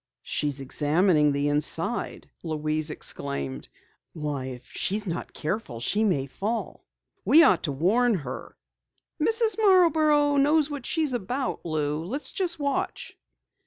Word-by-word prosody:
"She's 145 -2 -1
examining 150 +3 +2
the 140 +1 0
inside!" 145 0 -1
Louise 155 -1 -2
exclaimed. 70 - -4 0.5
"Why, 150 -4 -4
if 125 -1 -8
she's 210 +2 -1
not 170 -2 -4
careful, 155 - -4
she 205 - +1
may 170 -11 +1
fall. 210 - -5 0.4
We 325 +2 +7
ought 285 - +4
to 150 - -2
warn 210 - +2
her 135 -7 -7 0.3
" - - -20
"Mrs. 450 0 +3
Marborough 310 -7 +4
knows 295 +2 +3
what 280 -4 -5
she 320 - 0
is 285 -4 +1
about, 245 +4 -3
Lou. 150 -1 -1
Let's 260 - -1
just 350 -3 0
watch." 280 -2 -3
185 Hz, 135 wpm, -26 LUFS, -, 0.5 s, We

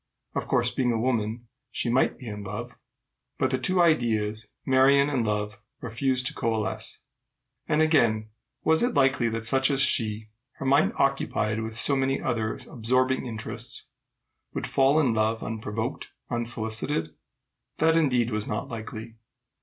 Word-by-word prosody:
Of - - -3
course, - - +2
being 125 -2 +1
a 115 - 0
woman, 115 -1 -1 0.2
she - - -2
might 125 +3 +2
be 125 - -10
in 105 -1 -5
love; 95 - -6 0.6
but - - +1
the 130 - 0
two 185 +8 0
ideas, 110 -9 +2 0.2
Marion 140 +2 +5
and 130 -5 +1
love, 105 -1 -2 0.2
refused 125 +2 -1
to - - -1
coalesce. 110 -2 -2 0.6
And 155 +1 +3
again, 115 -9 +2 0.3
was 160 0 +3
it 245 +1 +1
likely 135 -3 +3
that 115 0 -4
such 135 +3 +3
as 135 -2 +1
she, 110 -4 +2 0.2
her - - -7
mind 140 +3 +4
occupied 110 -5 0
with 110 0 -5
so 140 +3 +2
many 135 0 +1
other 110 -4 -1
absorbing 130 0 +1
interests, 110 -2 -5 0.7
would - - -2
fall 135 +3 +3
in 130 -7 +3
love 110 +1 +1
unprovoked, 110 +2 -4 0.2
unsolicited? 110 - -2 0.6
That, 160 +1 +4
indeed, 125 -7 +2
was 105 -1 -2
not 105 +6 -3
likely. 115 -1 -7
120 Hz, 150 wpm, -26 LUFS, 110-135 Hz, 0.7 s, Marion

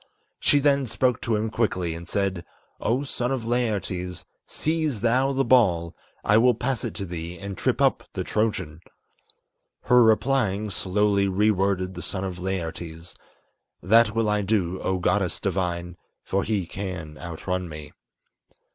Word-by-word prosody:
She 145 - +4
then 140 -2 +2
spoke 125 +1 +1
to 115 - 0
him 110 +1 -1
quickly, 95 -7 0
and 85 +1 -8
said, 95 -2 -1 0.4
"O 125 +5 0
son 125 -2 -2
of 130 -4 -2
Laertes, 100 -7 -2 0.2
Seize 155 -8 -1
thou 125 +4 +2
the 135 0 +1
ball; 95 -10 +3 0.3
I 105 +2 +5
will 125 0 +4
pass 125 +1 -2
it - - -4
to 100 - -4
thee 85 0 -6
and 100 +2 -6
trip - - 0
up - - +2
the - - -2
Trojan." 105 -8 -1 1.0
Her 125 0 +5
replying, 110 -3 +2
slowly 100 +1 +1
re 105 +3 +3
worded 95 -1 0
the - - -7
son 95 -1 -4
of 90 -2 -4
Laertes 85 -2 -5 0.7
"That 110 +3 +5
will 115 -1 +2
I 105 0 +2
do, 95 -3 0
O 95 - 0
goddess 90 0 +1
divine, 90 -2 -2 0.3
for 100 - 0
he 105 -4 -1
can 90 -4 -6
outrun 90 +1 -4
me." 75 -1 -8
100 Hz, 155 wpm, -25 LUFS, 90-115 Hz, 1.0 s, I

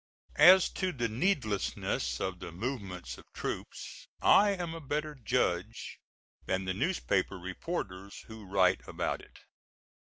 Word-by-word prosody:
As 185 0 +9
to 185 -1 -1
the 120 -7 -1
needlessness 110 - 0
of 95 -1 -3
the 85 - -7
movements 90 - -5
of - - -13
troops - - -6
I 205 +1 +6
am 175 -4 -2
a 165 - -7
better 150 +1 -2
judge 125 -8 -1 0.5
than 95 0 0
the 95 - -1
newspaper 100 - 0
reporters 95 - -5
who 110 -3 -11
write 95 -1 +3
about - - -2
it. - - -17
110 Hz, 130 wpm, -31 LUFS, 95-155 Hz, 0.5 s, As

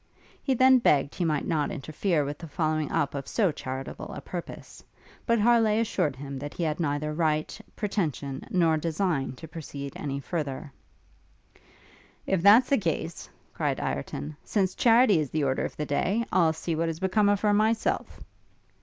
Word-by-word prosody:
He 265 - +1
then 260 +1 +6
begged 145 - +2
he 180 - -2
might 150 -3 0
not 155 -4 0
interfere 155 -1 -1
with 145 +1 -5
the 165 - -8
following 155 -1 -1
up 140 - 0
of 140 -1 -5
so 200 -7 +2
charitable 135 -2 -6
a - - -5
purpose: - - -8 0.4
but 230 -1 +3
Harleigh 225 -1 +4
assured 155 -10 0
him 135 0 -7
that 145 +2 -7
he 175 - -2
had 155 0 -1
neither 150 -1 -1
right, 155 -1 0 0.2
pretension, 150 - -2
nor 165 -3 +3
design 160 -3 -1
to 160 +5 -10
proceed 140 -3 -7
any 140 -2 -4
farther. 140 -2 -4 1.5
'If 190 -3 +1
that's 215 +7 +7
the 275 - +3
case,' 165 -2 -3 0.2
cried - - -1
Ireton, 70 - -4
'since 190 -3 0
charity 230 -5 +5
is 150 -3 -2
the 155 -1 -1
order 130 -1 0
of - - -7
the 150 - -2
day, 195 +11 0
I'll 165 -4 +3
see 160 +1 -3
what 165 +1 0
is 160 0 -5
become 200 +2 +2
of 205 -1 +2
her 210 -1 +3
myself.' 220 +2 0
160 Hz, 170 wpm, -27 LUFS, 145-200 Hz, 1.5 s, that's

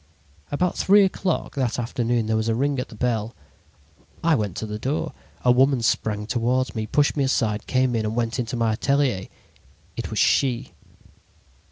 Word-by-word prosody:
"About 180 +5 0
three 200 +1 +6
o'clock 185 -2 -2
that 130 -5 -1
afternoon 120 -1 -1
there 110 0 0
was 110 +1 0
a 115 - +1
ring 140 +2 0
at 125 - -4
the - - -11
bell. 115 -1 -1 0.9
I 165 -1 +4
went 105 - -1
to - - -3
the 105 0 -5
door. 135 +7 -2 0.3
A 125 - +6
woman 130 0 +3
sprang 105 -2 0
toward 125 +4 0
me, 110 -2 -3
pushed 145 +4 +2
me 140 - +1
aside, 110 -5 0
came 130 -1 +1
in 110 - 0
and 110 +1 -2
went 120 +1 -1
into 120 0 -2
my 115 -1 +1
atelier. 130 -5 0 0.7
It - - -4
was - - -5
she! 130 -5 +2
120 Hz, 180 wpm, -23 LUFS, 110-135 Hz, 0.9 s, three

